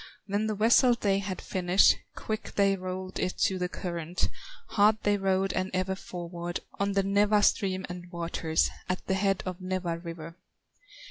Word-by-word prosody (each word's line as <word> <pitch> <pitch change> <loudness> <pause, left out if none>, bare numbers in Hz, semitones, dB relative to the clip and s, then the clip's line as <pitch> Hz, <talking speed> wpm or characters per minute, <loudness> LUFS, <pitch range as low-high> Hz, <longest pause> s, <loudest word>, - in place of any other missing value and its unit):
When 205 +2 0
the 215 - -1
vessel 235 +4 +5
they 200 -4 +1
had 190 -1 -4
finished, 185 +1 +4 0.2
Quick 215 -1 -5
they 195 -1 +4
rolled 185 0 -5
it 185 - -1
to 190 -1 0
the 180 0 -1
current, 170 -1 -3 0.4
Hard 210 +1 +4
they 205 0 +3
rowed 195 -1 +1
and 185 0 -1
ever 185 +1 0
forward, 175 -2 -5 0.2
On 200 0 +1
the 195 0 +2
Nawa 205 +1 +3
stream 190 -2 +2
and 175 0 -8
waters, 165 -2 0 0.2
At 185 - -2
the 190 - 0
head 195 0 +1
of 185 0 -5
Nawa 185 -2 -2
river. 165 -1 -8
185 Hz, 165 wpm, -29 LUFS, 180-200 Hz, 0.4 s, vessel